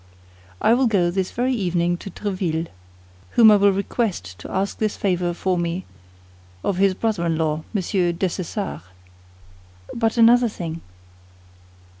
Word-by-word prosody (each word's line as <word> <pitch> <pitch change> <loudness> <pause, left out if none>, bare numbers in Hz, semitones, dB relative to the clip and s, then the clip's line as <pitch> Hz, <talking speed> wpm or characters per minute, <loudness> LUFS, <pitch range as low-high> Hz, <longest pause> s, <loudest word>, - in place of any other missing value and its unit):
"I 225 - +4
will 255 +1 +3
go 185 -6 +2
this 185 0 -1
very 255 +2 -1
evening 175 -5 0
to 195 - -8
Tréville, 175 -4 -3 0.7
whom 225 -2 +9
I - - +7
will 200 0 +4
request 190 - -2
to - - -9
ask 195 +1 -2
this 215 -1 -1
favor 180 -3 0
for 180 +1 -1
me 175 +2 -2 0.8
of 195 - -1
his 195 0 +3
brother 215 -4 -1
in 165 -1 0
law, 155 -1 -1
Monsieur 185 -3 0
Dessessart." 185 - -3 1.1
"But 225 0 0
another 235 +1 +6
thing." 165 -5 -6
190 Hz, 140 wpm, -22 LUFS, 175-215 Hz, 1.1 s, whom